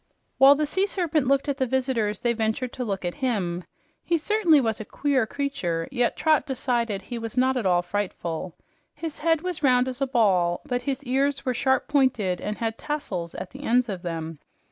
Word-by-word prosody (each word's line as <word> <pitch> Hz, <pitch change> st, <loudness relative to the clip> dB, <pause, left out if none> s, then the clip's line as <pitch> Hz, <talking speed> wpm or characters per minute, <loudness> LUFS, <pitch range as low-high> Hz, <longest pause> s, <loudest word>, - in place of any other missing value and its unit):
While 275 Hz, +1 st, +8 dB
the 305 Hz, +1 st, 0 dB
sea 380 Hz, +7 st, +1 dB
serpent 330 Hz, -8 st, 0 dB
looked 275 Hz, +2 st, +2 dB
at 280 Hz, -1 st, -1 dB
the 260 Hz, -2 st, 0 dB
visitors, 245 Hz, -5 st, 0 dB
they 240 Hz, -1 st, +2 dB
ventured 225 Hz, +3 st, -1 dB
to 255 Hz, -, -3 dB
look 195 Hz, -5 st, -3 dB
at 175 Hz, -, -1 dB
him. 185 Hz, -9 st, -1 dB, 0.4 s
He 340 Hz, -, +1 dB
certainly 340 Hz, -2 st, +3 dB
was 225 Hz, -4 st, 0 dB
a -, -, -4 dB
queer 265 Hz, +1 st, 0 dB
creature, 185 Hz, -13 st, -2 dB
yet 245 Hz, -3 st, 0 dB
Trot 310 Hz, -1 st, +2 dB
decided 240 Hz, -6 st, -1 dB
he 235 Hz, +4 st, -6 dB
was 225 Hz, +1 st, -5 dB
not 260 Hz, +1 st, +3 dB
at 235 Hz, -6 st, 0 dB
all 175 Hz, -1 st, +3 dB
frightful. 175 Hz, -3 st, -4 dB, 0.4 s
His 315 Hz, 0 st, -6 dB
head 325 Hz, 0 st, +2 dB
was 360 Hz, -4 st, -3 dB
round 255 Hz, -3 st, +4 dB
as 260 Hz, +1 st, -4 dB
a 275 Hz, -, +2 dB
ball, 190 Hz, -9 st, +2 dB
but 245 Hz, -1 st, -1 dB
his 275 Hz, 0 st, -3 dB
ears 275 Hz, +2 st, 0 dB
were 255 Hz, -, +1 dB
sharp 265 Hz, +2 st, +1 dB
pointed 240 Hz, -, +1 dB
and 210 Hz, 0 st, -3 dB
had 225 Hz, -1 st, -3 dB
tassels 205 Hz, -, -4 dB
at -, -, -6 dB
the 275 Hz, -, -10 dB
ends 245 Hz, -2 st, +2 dB
of 190 Hz, -3 st, -4 dB
them. 165 Hz, -3 st, -5 dB
250 Hz, 205 wpm, -25 LUFS, 205-280 Hz, 0.4 s, While